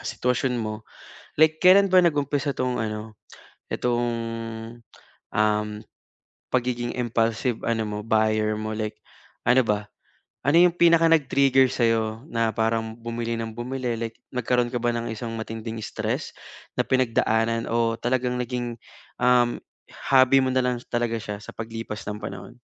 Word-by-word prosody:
sitwasyon 125 +1 -1
mo, 110 -1 -4 0.5
like 155 +1 +4
kailan 195 +2 +6
ba 185 - +6
nag-umpisa 145 -4 +1
itong 125 -1 -1
ano, 110 -1 -4 0.6
itong, 120 0 0 1.3
um, 105 0 +2 0.9
pagiging 120 -1 0
impulsive 115 0 0
ano 115 -1 +1
mo, 105 0 -4
buyer 110 -1 +2
mo 110 0 -4
like 110 -1 -3 0.5
ano 130 +1 +5
ba? 105 -1 -1 0.5
Ano 145 +4 +4
yung 175 0 +6
pinaka 170 -1 +5
nag-trigger 135 -4 +4
sa'yo 115 +1 0
na 115 -3 0
parang 110 +1 -1
bumili 115 0 -3
ng 110 -1 -5
bumili, 125 0 -3
like 115 0 -5 0.2
nagkaroon 125 0 +1
ka 125 - -2
ba 120 - +2
ng 115 0 -3
isang 115 +1 -5
matinding 115 0 -5
stress - - -3 0.4
na - - +3
pinagdaanan 115 -3 +1
o 115 0 +1
talagang 125 0 0
naging, 120 -1 -3 0.5
um, 125 -1 +3 0.5
hobby 130 0 +6
mo 130 - +1
nalang 125 -2 +1
talaga 120 -1 0
siya 105 0 -5
sa 105 - -11
paglipas 115 -1 -6
ng 105 - -3
panahon? 120 - -8
120 Hz, 135 wpm, -25 LUFS, 110-130 Hz, 1.3 s, kailan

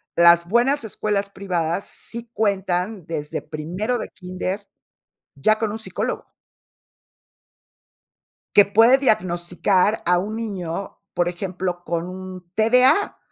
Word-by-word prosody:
las 170 0 +6
buenas 240 +7 +2
escuelas 205 -2 -2
privadas 180 -2 -2
sí 235 0 -4
cuentan 195 -2 -1
desde 150 -3 -4
primero 180 +10 -3
de - - -5
kínder, 185 +2 -5 0.7
ya 215 +11 +2
con 215 -1 -1
un 220 - -5
psicólogo. 225 - -4 2.3
Que 205 - +8
puede 225 +6 +6
diagnosticar 185 -3 +1
a 180 0 +4
un 210 +4 -3
niño, 195 -5 -5
por 175 0 +1
ejemplo, 180 0 -4
con 170 +1 -2
un 185 -1 -9
TDA 250 - +4
190 Hz, 115 wpm, -22 LUFS, 175-220 Hz, 2.3 s, Que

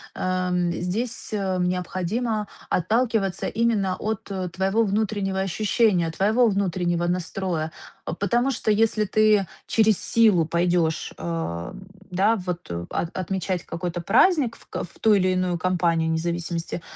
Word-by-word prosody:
э, - - -9
м, 180 -1 0
здесь, 215 +10 -3
о, 195 -3 -1
необходимо 185 +5 -1 0.2
отталкиваться 215 0 +1
именно 215 -5 +1
от, 220 -1 -4
о, 185 -2 -3
твоего 190 +5 +1
внутреннего 210 -1 0
ощущения, 195 -1 +2
твоего 215 +8 +3
внутреннего 180 -4 0
настроя. 175 -2 -2 0.3
Потому 240 +9 0
что 220 - 0
если 215 0 +3
ты 210 -1 +3 0.2
через 220 -3 +3
силу 215 -8 +4
пойдешь, 170 -1 0
э, - - -11
м, 165 - -4 0.2
да, 200 +5 +2
вот, 180 - -5
о, 85 0 -4
от 170 - -3
отмечать 185 -1 -2
какой-то 175 0 -4
праздник 250 - +3
в - - -19
ко - - -4
в 175 - -18
ту 220 - +5
илиную 185 -2 +1
компанию, 170 -2 +1
не 160 - +1
зависимости, 170 0 -3
185 Hz, 140 wpm, -24 LUFS, 175-215 Hz, 0.3 s, ту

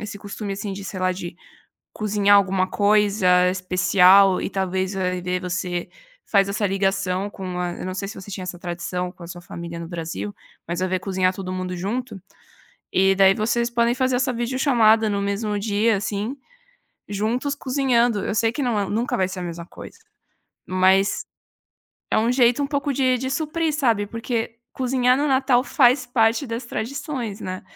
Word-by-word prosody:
esse 205 -1 -7
costume 205 0 -5
assim 200 0 -5
de, 195 - -7
sei 190 - -6
lá, 185 0 +2
de 175 -1 -7 0.6
cozinhar 205 -1 +3
alguma 190 -1 +1
coisa 200 -3 +3
especial 185 +1 +4
e - - -2
talvez 190 0 -2
a 185 -1 0
ideia 180 0 -2
de 180 - -5
você 175 -1 -3 0.4
faz 200 -1 +3
essa 205 +1 0
ligação 195 0 -1
com 185 -3 -6
a 175 -1 -2
eu - - -5
não 185 - -4
sei 195 +1 -4
se 205 - -7
você 195 +2 -11
tinha 185 - -5
essa 180 -1 -6
tradição 180 +1 -4
com 180 - -16
a - - -8
sua 175 0 -8
família 170 -1 -7
no 165 - -7
Brasil, 160 - -5 0.3
mas 175 +1 -2
a 185 - +2
ver 185 0 0
cozinhar 185 -1 0
todo 185 -1 -5
mundo 185 0 -4
junto, 205 +4 -4 0.7
e 195 +1 +4
daí 195 0 +6
vocês 235 +3 0
podem 235 0 +2
fazer 255 -1 +1
essa 255 +1 0
videochamada 235 -3 +3
no 200 - -1
mesmo 205 +1 -1
dia 210 +1 +1
assim, 205 +6 -3 0.7
juntos 230 +8 -1
cozinhando, 250 -6 +1
eu - - -2
sei 225 +1 +2
que 280 +4 -3
não 235 -4 0
é 200 - -1
nunca 230 +4 -1
vai 190 - +1
ser 185 0 -6
a - - -4
mesma 170 -1 -6
coisa. 460 - -12 0.7
Mas, 190 +1 +2 0.9
é - - +3
um 230 +3 +2
jeito 250 +2 +3
um 280 - -1
pouco 285 -1 -1
de 255 -1 +2
de 260 +1 -3
suprir 315 +2 -1
sabe, 230 -9 +1
porque 230 +1 -3 0.2
cozinhar 255 -1 +2
no 295 - +1
Natal 260 -2 +3
faz 255 -2 +4
parte 240 +2 +2
das 230 +2 -4
tradições, 245 -2 -4
né. 185 0 -5
205 Hz, 185 wpm, -22 LUFS, 185-240 Hz, 0.9 s, daí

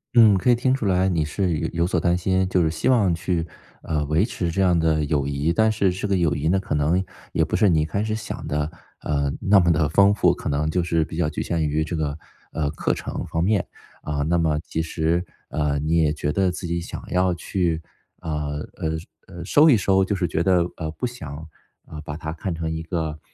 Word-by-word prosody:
嗯。 110 -3 +7
可 125 - +1
以 120 - +6
听 130 +2 +1
出 135 -5 -1
来 95 -1 +2
你 85 -5 +1
是 85 +2 -1
有 80 +2 -2
有 85 +1 +1
所 90 - +1
担 85 +2 +2
心， 95 +1 +1
就 90 -2 +2
是 80 - +1
希 80 - -1
望 105 -8 +4
去， 85 0 -1 0.4
呃 75 -2 -1
维 80 +7 +2
持 90 -7 -3
这 95 - 0
样 90 -2 +4
的 80 -2 +2
友 70 -2 0
谊， 70 +4 0
但 110 +2 +3
是 100 -3 +1
这 95 +3 -3
个 100 - +1
友 85 -4 +1
谊 75 +2 -1
呢， 95 +3 +3
可 95 - -4
能 80 +6 +2 0.3
也 - - +2
不 - - -2
是 105 - +4
你 80 -3 +3
一 - - 0
开 100 +7 -2
始 110 0 -1
想 110 - -6
的， 75 +1 -1 0.3
呃， 70 -2 0
那 100 0 +5
么 85 -1 +3
地 75 -2 +2
丰 100 +6 +5
富。 105 - +3
可 - - -5
能 75 +2 0
就 90 +2 0
是 85 -2 +1
比 - - -9
较 80 -3 +1
局 - - -4
限 80 -3 0
于 75 +2 0
这 80 +2 -4
个， 75 -2 -2 0.3
呃， 75 -2 -1
课 - - -1
程 - - -5
方 80 +1 -1
面， 100 0 +1 0.3
啊， 75 -1 -2
那 85 +3 +1
么 80 -2 +1
其 80 - -3
实， 80 +2 0 0.3
呃， 75 -1 0
你 80 +3 +1
也 75 -2 +3
觉 75 -1 -2
得 95 0 +1
自 90 +1 -6
己 85 0 -2
想 - - -7
要 90 0 +2
去， 85 -2 -1 0.4
呃 80 - -4 0.4
呃 80 - -2 0.4
呃， 85 -1 -8
收 150 - +5
一 125 - +6
收。 95 -1 +3
就 100 +2 -1
是 90 -2 0
觉 80 0 -1
得， 90 -1 +3
呃， 80 -2 -3
不 125 - -4
想， 80 - -7 0.4
呃， 75 - -9
把 75 0 -6
它 80 -1 -5
看 85 +2 -4
成 80 0 -3
一 80 0 -3
个， 80 -2 -3
85 Hz, 260 characters per minute, -23 LUFS, 80-95 Hz, 0.4 s, 嗯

